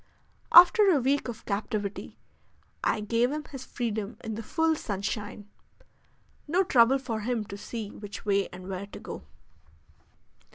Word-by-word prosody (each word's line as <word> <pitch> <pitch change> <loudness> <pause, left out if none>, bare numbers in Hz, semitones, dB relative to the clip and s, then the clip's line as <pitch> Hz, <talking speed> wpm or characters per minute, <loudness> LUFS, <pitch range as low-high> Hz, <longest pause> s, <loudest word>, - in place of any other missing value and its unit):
After 390 +4 +8
a 320 -6 +4
week 270 +2 +1
of 235 -3 -7
captivity 205 0 -3 0.7
I 210 - +1
gave 230 +4 +1
him 300 +1 -3
his 270 -3 -9
freedom 220 -2 -3
in 225 - -4
the 220 - -4
full 320 +7 +1
sunshine: 205 -3 -4 1.0
no 355 +6 +3
trouble 255 -5 +5
for 240 -5 -4
him 225 0 -2
to 200 - -8
see 210 0 -6
which 205 0 -9
way 200 -1 +2
and 180 0 -10
where 195 +1 -5
to - - -10
go. - - -8
225 Hz, 150 wpm, -28 LUFS, 205-270 Hz, 1.0 s, After